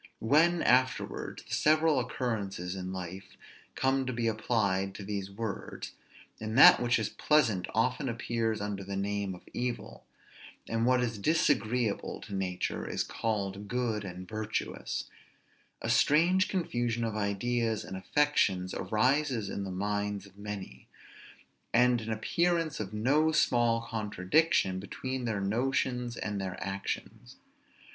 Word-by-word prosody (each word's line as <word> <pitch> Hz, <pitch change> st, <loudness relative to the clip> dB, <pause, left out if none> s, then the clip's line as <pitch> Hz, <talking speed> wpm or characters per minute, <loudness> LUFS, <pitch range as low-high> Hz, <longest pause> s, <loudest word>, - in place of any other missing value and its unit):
When, 160 Hz, +8 st, +3 dB
afterwards, 125 Hz, +1 st, +1 dB
the -, -, -8 dB
several 155 Hz, -2 st, +4 dB
occurrences 100 Hz, -8 st, -3 dB
in 95 Hz, -1 st, -5 dB
life 95 Hz, +1 st, -7 dB, 0.4 s
come 135 Hz, 0 st, +1 dB
to -, -, 0 dB
be 115 Hz, 0 st, -1 dB
applied 100 Hz, -4 st, 0 dB
to 100 Hz, -, -7 dB
these 100 Hz, -1 st, -4 dB
words, 100 Hz, 0 st, -5 dB, 0.5 s
and 110 Hz, +2 st, -3 dB
that -, -, +10 dB
which 120 Hz, 0 st, +2 dB
is 110 Hz, -, -1 dB
pleasant 115 Hz, -12 st, +2 dB
often 125 Hz, +4 st, +1 dB
appears 115 Hz, -2 st, -1 dB
under 100 Hz, -1 st, -3 dB
the 100 Hz, +1 st, -5 dB
name 100 Hz, -1 st, -2 dB
of 90 Hz, -, -16 dB
evil; 125 Hz, 0 st, -4 dB, 0.6 s
and 115 Hz, +1 st, 0 dB
what 125 Hz, -1 st, +4 dB
is 115 Hz, -3 st, -2 dB
disagreeable 120 Hz, -5 st, +1 dB
to -, -, -9 dB
nature 95 Hz, -2 st, -2 dB
is -, -, 0 dB
called 100 Hz, -2 st, -3 dB
good 115 Hz, -2 st, -1 dB
and 90 Hz, -1 st, -7 dB
virtuous; 110 Hz, 0 st, -3 dB, 0.8 s
a -, -, -1 dB
strange 175 Hz, +5 st, +4 dB
confusion 120 Hz, -, -1 dB
of 110 Hz, -2 st, -2 dB
ideas 110 Hz, +2 st, 0 dB
and 95 Hz, -, -7 dB
affections 95 Hz, -5 st, +1 dB
arises 125 Hz, +2 st, +1 dB
in 100 Hz, -, -3 dB
the -, -, -5 dB
minds 100 Hz, +1 st, -2 dB
of 100 Hz, -1 st, -17 dB
many; 100 Hz, -11 st, -7 dB, 0.9 s
and 125 Hz, 0 st, +4 dB
an 110 Hz, 0 st, -4 dB
appearance 165 Hz, +8 st, 0 dB
of 100 Hz, -3 st, -4 dB
no 140 Hz, +9 st, +2 dB
small 120 Hz, -6 st, +3 dB
contradiction 105 Hz, -, +1 dB
between 130 Hz, +6 st, -4 dB
their 110 Hz, -4 st, -1 dB
notions 125 Hz, +3 st, 0 dB
and 105 Hz, -1 st, -3 dB
their 95 Hz, -1 st, -4 dB
actions. 95 Hz, +3 st, -5 dB
110 Hz, 135 wpm, -30 LUFS, 100-125 Hz, 0.9 s, that